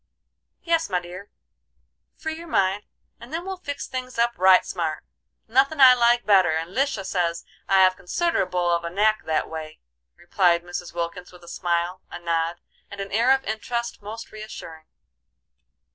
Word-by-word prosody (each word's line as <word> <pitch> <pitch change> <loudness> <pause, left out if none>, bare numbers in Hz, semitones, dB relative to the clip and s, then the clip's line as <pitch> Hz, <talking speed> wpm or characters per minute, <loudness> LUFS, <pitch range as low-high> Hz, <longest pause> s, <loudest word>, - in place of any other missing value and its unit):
"Yes, 330 -4 +1
my 180 -2 +1
dear, 180 +3 -10 0.9
free 315 -1 -4
your 335 +1 -10
mind, 195 - +1 0.3
and 235 - -12
then 335 +3 -4
we'll 380 0 -5
fix 285 -5 -5
things 255 -1 -6
up 235 +1 +3
right 185 0 +5
smart. 160 -4 -3 0.4
Nothin' 270 +6 +2
I 260 -2 +10
like 240 0 +3
better, 185 -6 +4
and 165 +2 -3
Lisha 265 -7 0
says 170 -3 -1 0.2
I 195 -1 +5
have 185 0 +4
considerable 180 - 0
of 170 0 +1
a 170 - -3
knack 215 +4 +1
that 155 -1 0
way," 155 -1 -8 0.4
replied 175 -1 +2
Mrs. 175 0 -6
Wilkins, 175 +2 -5
with 180 -1 -16
a - - -15
smile, 175 +1 -2
a - - -7
nod, 170 0 -2 0.3
and 200 - -10
an 195 0 -5
air 230 +4 +2
of 270 0 +3
interest 235 +2 -4
most 220 +3 -8
reassuring. 165 -7 -10
195 Hz, 165 wpm, -24 LUFS, 175-240 Hz, 0.9 s, I